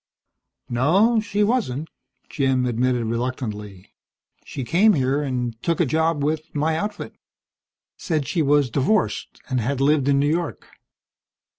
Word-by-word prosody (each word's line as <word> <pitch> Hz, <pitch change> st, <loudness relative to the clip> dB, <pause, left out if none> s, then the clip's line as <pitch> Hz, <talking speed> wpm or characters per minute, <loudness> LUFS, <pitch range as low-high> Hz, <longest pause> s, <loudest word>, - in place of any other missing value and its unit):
"No, 185 Hz, -, +3 dB
she 210 Hz, -1 st, 0 dB
wasn't," 205 Hz, -, 0 dB, 0.4 s
Jim 135 Hz, -3 st, 0 dB
admitted 125 Hz, 0 st, 0 dB
reluctantly. 110 Hz, -5 st, -4 dB, 0.5 s
"She 135 Hz, -, -6 dB
came 190 Hz, -, +4 dB
here 135 Hz, -1 st, +1 dB
and 125 Hz, -4 st, -3 dB
took 170 Hz, -2 st, -1 dB
a 170 Hz, -, +3 dB
job 160 Hz, +1 st, 0 dB
with 155 Hz, +2 st, -2 dB
my 155 Hz, +2 st, +1 dB
outfit. 205 Hz, +5 st, -4 dB, 0.8 s
Said 155 Hz, -6 st, -2 dB
she 165 Hz, -, 0 dB
was 145 Hz, -3 st, +2 dB
divorced, 165 Hz, -, 0 dB
and 130 Hz, -2 st, 0 dB
had 130 Hz, +4 st, -2 dB
lived 140 Hz, 0 st, +2 dB
in 140 Hz, -1 st, +3 dB
New 140 Hz, +1 st, +2 dB
York. 165 Hz, +1 st, -2 dB
140 Hz, 135 wpm, -22 LUFS, 125-165 Hz, 0.8 s, came